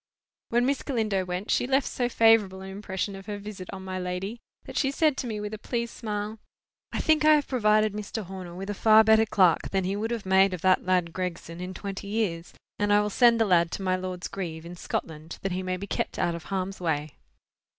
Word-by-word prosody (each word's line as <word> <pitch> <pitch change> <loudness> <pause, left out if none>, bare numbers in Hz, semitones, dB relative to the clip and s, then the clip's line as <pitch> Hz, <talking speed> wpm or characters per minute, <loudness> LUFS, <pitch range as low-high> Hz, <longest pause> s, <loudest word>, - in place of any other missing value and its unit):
When 240 +1 +2
Miss 275 +1 +1
Galindo 215 -8 -1
went, 180 +3 -3
she - - +2
left 270 +1 +2
so 245 -1 -1
favourable 225 -5 +4
an 190 0 -7
impression 195 0 -4
of 195 +1 -11
her 205 -1 -4
visit 200 -3 -8
on 190 -1 -8
my 185 0 -4
lady, 185 +5 -4 0.2
that - - -10
she 270 - +2
said 300 +1 +2
to 255 - -3
me 215 -2 -3
with 210 +1 -5
a 215 - -5
pleased 235 +1 -3
smile— 210 -1 -4 0.5
"I - - -2
think 310 -1 +3
I 310 0 +7
have 295 -1 0
provided 215 -4 +3
Mr. 210 +1 -4
Horner 185 -2 -8
with 195 +3 -5
a - - -2
far 220 +2 +6
better 220 0 +5
clerk 185 -5 +3
than 195 -1 0
he 190 +2 -1
would 215 +2 -2
have 235 -4 -3
made 190 0 +4
of 175 - -10
that 185 0 +3
lad 180 -3 +1
Gregson 175 -2 -5
in 185 +1 -6
twenty 200 0 -6
years. 200 -6 -2 0.3
And 205 0 +1
I 205 - +6
will 210 0 0
send 235 +1 +5
the 225 - +4
lad 170 -4 +3
to 195 - -4
my 185 -1 +2
lord's 185 -1 -4
grieve, 165 -4 -6
in 175 +1 -8
Scotland, 160 -2 -5
that 195 - -1
he 185 +1 -2
may 185 0 -2
be 200 - -6
kept - - -3
out 175 - +1
of 170 0 -7
harm's 195 0 -3
way." 150 -3 -2
195 Hz, 235 wpm, -27 LUFS, 185-220 Hz, 0.5 s, I